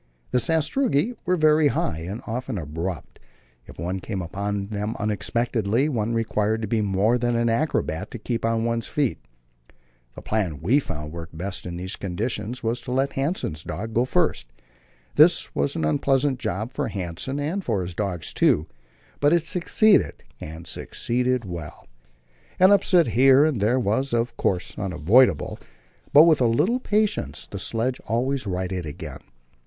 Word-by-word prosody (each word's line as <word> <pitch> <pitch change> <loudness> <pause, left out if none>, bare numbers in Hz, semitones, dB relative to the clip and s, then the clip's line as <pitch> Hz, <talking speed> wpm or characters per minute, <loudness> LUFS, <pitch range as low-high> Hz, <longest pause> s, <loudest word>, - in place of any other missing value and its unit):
The 125 - +3
sastrugi 160 - +1
were 180 - +3
very 155 -2 +4
high, 80 - -1
and 95 +7 -6
often 125 0 -4
abrupt; 80 0 -5 0.5
if - - -13
one 90 +4 -3
came 95 -1 -4
on 100 +3 -3
them 105 +1 -3
unexpectedly, 115 +3 0
one 115 -4 -1
required 110 -1 0
to - - -1
be 110 +1 +1
more 105 +4 +2
than 120 0 0
an 115 0 +2
acrobat 115 - -1
to - - -7
keep 115 +1 -3
on 115 0 +1
one's 115 -1 -1
feet. 135 - -1 1.0
The - - -10
plan 95 -10 -1
we 115 - +3
found 75 - -6
to - - -12
work 85 -1 -7
best 90 +4 -5
in 85 - -5
these 90 +2 -4
conditions 105 +5 -3
was 115 +2 0
to 125 - -6
let 135 +2 +1
Hanssen's 135 - -2
dogs 105 +6 -5
go 120 - +3
first; - - 0 0.7
this - - +5
was 70 0 0
an 80 - -1
unpleasant 130 - +1
job 110 +2 -3
for - - -2
Hanssen, 95 - -4
and 165 +7 -2
for 105 - -1
his 90 0 -5
dogs 90 -4 -3
too, 75 - +3 0.5
but 145 +1 +3
it 170 -2 +3
succeeded, 190 +5 +3 0.2
and 80 +2 -8
succeeded 125 +6 -1
well. 85 -4 -8 0.7
An 185 +2 +7
upset 180 -6 +4
here 135 +6 +6
and 145 -10 0
there 115 +5 +3
was, 120 +4 0
of 115 +1 -1
course, 90 -2 -1
unavoidable, 95 - +3 0.5
but 150 - +9
with 160 -4 +4
a 120 - +4
little 190 - +2
patience 215 -3 0
the 100 - -7
sledge 115 +5 -1
was - - -20
always 125 +1 0
righted 90 -2 -3
again. 75 -3 -7
115 Hz, 165 wpm, -24 LUFS, 95-130 Hz, 1.0 s, but